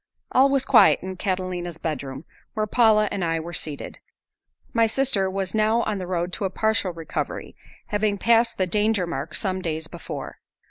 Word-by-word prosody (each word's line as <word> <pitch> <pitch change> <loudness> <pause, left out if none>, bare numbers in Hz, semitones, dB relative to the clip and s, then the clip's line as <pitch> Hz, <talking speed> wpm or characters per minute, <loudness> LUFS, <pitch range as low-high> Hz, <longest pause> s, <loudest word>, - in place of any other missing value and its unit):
All 270 +2 +5
was 275 -1 +1
quiet 225 -8 +6
in 190 0 -5
Catalina's 180 -3 -3
bedroom, 140 -3 -5 0.3
where 215 0 0
Paula 215 -1 +4
and 190 - -2
I 165 -1 0
were 170 +2 -7
seated. 150 -3 -3 0.7
My 230 -1 +4
sister 220 -6 +1
was 190 -1 -3
now 220 +2 +2
on 210 -2 -2
the 180 - -5
road 175 0 -2
to 205 - -2
a - - 0
partial 220 -1 +1
recovery, 165 -1 -5 0.3
having 210 -1 0
passed 230 +2 +3
the 185 - +2
danger 210 0 +1
mark 155 -2 -4
some 190 -2 -1
days 160 -2 -2
before. - - -7
190 Hz, 175 wpm, -24 LUFS, 175-220 Hz, 0.7 s, quiet